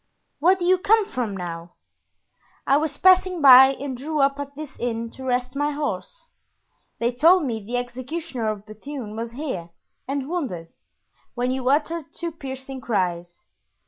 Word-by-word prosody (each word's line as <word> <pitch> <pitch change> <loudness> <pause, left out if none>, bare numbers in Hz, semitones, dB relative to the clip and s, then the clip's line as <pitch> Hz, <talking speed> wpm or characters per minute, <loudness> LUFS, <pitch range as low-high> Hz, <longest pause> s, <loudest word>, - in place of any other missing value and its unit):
"Where 355 +6 +5
do 360 -2 -4
you 370 +1 +4
come 425 +2 +3
from 235 - -3
now?" 170 -1 -7 0.9
"I 275 - +4
was 300 -1 -2
passing 370 -1 +4
by 265 -1 +9
and 270 -1 -5
drew 300 +5 -3
up 275 0 +2
at 285 0 -6
this 300 -2 -8
inn 230 -1 -3
to 265 - -11
rest 250 0 -1
my 290 +1 +1
horse. 300 +11 -5 0.7
They 235 +1 0
told 330 +7 +4
me 225 -5 -3
the 240 +4 -3
executioner 250 0 -4
of 210 -1 -5
Bethune 215 +1 -8
was 230 +1 -5
here 245 - -5 0.4
and 275 0 -2
wounded, 255 - -4 0.7
when 250 +1 0
you 260 -1 -1
uttered 305 +2 0
two 340 -1 -4
piercing 265 -3 -8
cries. 175 -6 -2
265 Hz, 160 wpm, -23 LUFS, 235-305 Hz, 0.9 s, by